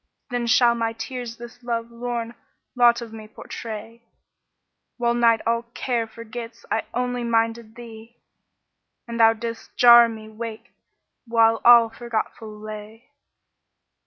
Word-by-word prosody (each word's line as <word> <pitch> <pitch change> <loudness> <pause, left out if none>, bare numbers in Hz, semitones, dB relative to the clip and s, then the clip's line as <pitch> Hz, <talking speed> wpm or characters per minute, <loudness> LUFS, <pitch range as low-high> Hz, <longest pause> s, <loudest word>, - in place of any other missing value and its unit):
* - - -55
Then 245 -1 -2
shall 240 0 +5
my 230 -1 -2
tears 240 -1 -6
this 240 +1 -11
love 235 -1 -3
lorn 235 -1 -4 0.4
lot 240 -1 +4
of 225 -1 -11
me 215 -1 -9
portray. 225 +1 -8 1.0
While 235 -1 +1
night 235 -2 +3
all 230 0 +1
care 235 -3 -1
forgets 230 +1 -9
I 225 - 0
only 245 0 -2
minded 230 -1 -1
thee, 230 0 -12 0.4
* - - -56
And 235 0 -5
thou 225 0 +6
didst 230 0 -8
gar 240 -1 +8
me 220 -1 -9
wake 220 0 -8 0.6
while 225 -1 +3
all 235 -1 +7
forgetful 225 -1 -4
lay." 215 +3 -10
230 Hz, 135 wpm, -23 LUFS, 225-240 Hz, 1.0 s, gar